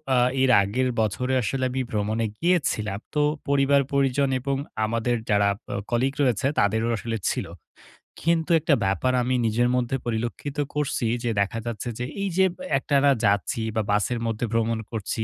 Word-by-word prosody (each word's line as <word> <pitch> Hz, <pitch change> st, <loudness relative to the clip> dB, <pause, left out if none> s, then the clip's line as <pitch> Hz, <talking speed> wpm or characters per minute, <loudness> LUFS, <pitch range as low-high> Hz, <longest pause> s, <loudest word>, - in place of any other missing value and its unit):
আ -, -, +4 dB, 0.2 s
এর 130 Hz, -1 st, +4 dB
আগের 125 Hz, +6 st, 0 dB
বছরে 125 Hz, +5 st, -1 dB
আসলে 130 Hz, +5 st, -2 dB
আমি 130 Hz, 0 st, -1 dB
ভ্রমণে 110 Hz, +2 st, 0 dB
গিয়েছিলাম। 135 Hz, -, 0 dB, 0.2 s
তো 150 Hz, -, +3 dB, 0.3 s
পরিবার-পরিজন 140 Hz, -1 st, +2 dB
এবং 135 Hz, +2 st, -1 dB, 0.3 s
আমাদের 115 Hz, +2 st, 0 dB
যারা 100 Hz, -1 st, +3 dB, 0.3 s
আ -, -, -2 dB, 0.2 s
কলিগ 130 Hz, +3 st, +1 dB
রয়েছে, 125 Hz, -2 st, +2 dB
তাদেরও 110 Hz, +3 st, +2 dB
আসলে 115 Hz, +3 st, -3 dB
ছিল। -, -, -3 dB, 0.8 s
কিন্তু 165 Hz, +1 st, +1 dB
একটা 155 Hz, -1 st, +3 dB
ব্যাপার 100 Hz, +7 st, +1 dB
আমি 125 Hz, +1 st, 0 dB
নিজের 120 Hz, +3 st, +2 dB
মধ্যে 125 Hz, +1 st, 0 dB
পরিলক্ষিত 120 Hz, +5 st, -3 dB, 0.2 s
করসি 140 Hz, -5 st, -1 dB, 0.2 s
যে, 120 Hz, -, 0 dB
দেখা 105 Hz, +3 st, -1 dB
যাচ্ছে 120 Hz, 0 st, -4 dB
যে 125 Hz, -, -2 dB, 0.2 s
এই 195 Hz, -, 0 dB
যে 190 Hz, -, +6 dB
ব -, -, -33 dB, 0.2 s
একটানা 140 Hz, +1 st, +3 dB
যাচ্ছি 100 Hz, +3 st, +1 dB
বা 110 Hz, -, +2 dB
বাসের 105 Hz, +4 st, +1 dB
মধ্যে 115 Hz, +1 st, -1 dB
ভ্রমণ 115 Hz, 0 st, +1 dB
করছি। 110 Hz, 0 st, -3 dB
120 Hz, 160 wpm, -25 LUFS, 110-135 Hz, 0.8 s, যে